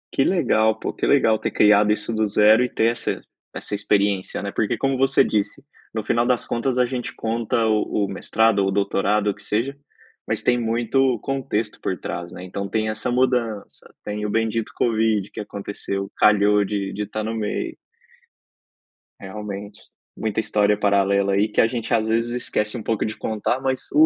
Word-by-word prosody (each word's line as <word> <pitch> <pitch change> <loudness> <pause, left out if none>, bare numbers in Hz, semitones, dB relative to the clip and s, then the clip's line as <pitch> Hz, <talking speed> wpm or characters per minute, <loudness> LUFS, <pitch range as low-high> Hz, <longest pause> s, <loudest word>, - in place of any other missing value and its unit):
Que 135 - +2
legal, 110 - +2
pô. - - -3
Que - - -2
legal 110 -1 +4
ter - - -2
criado 105 0 +5
isso 105 +2 -4
do 110 -1 +1
0 105 +3 +5
e 125 - -1
ter 115 0 +2
essa 120 - -3 0.3
essa - - -5
experiência, 100 -2 0
né? 100 - -3
Porque, 115 +3 -1
como 135 +3 0
você 135 +1 +4
disse, 105 -2 -1 0.3
no 110 -1 -2
final 120 +1 +2
das 125 -1 +1
contas 125 +2 -1
a 125 - +4
gente 125 -1 -4
conta 115 0 -1
o 105 -1 +1
o - - -5
mestrado 110 +2 +1
ou 95 - +2
o - - -1
doutorado, 100 +1 +1
o - - 0
que 100 - -13
seja, 115 +7 -1 0.5
mas - - -1
tem 120 - +2
muito 120 +2 +1
contexto 115 -5 -2
por 95 - -2
trás, 85 0 -6
né? 90 - -9
Então, 100 +2 -4
tem 110 -1 0
essa 110 +3 -2
mudança, 125 -4 -1
tem 105 0 -3
o - - -2
bendito 115 +1 -1
covid 110 -3 +1
que - - -8
aconteceu, 100 -1 -5
calhou 105 0 +4
de 100 -1 -3
de 105 - -3
estar 110 +1 -4
no 115 +1 -3
meio. 105 -2 -3 1.4
Realmente, 100 +1 -7 0.4
muita 110 -1 -2
história 105 -1 +2
paralela 100 -1 +2
aí 100 +2 +3
que 105 - +2
a - - +4
gente 115 0 -3
às 110 -1 +2
vezes 115 +1 +1
esquece 115 -2 -2
um 110 - -7
pouco 110 -1 -1
de 110 - -5
contar, 110 +3 -1
mas, 130 -1 -2
uh! 310 +1 +6
110 Hz, 190 wpm, -22 LUFS, 105-115 Hz, 1.4 s, uh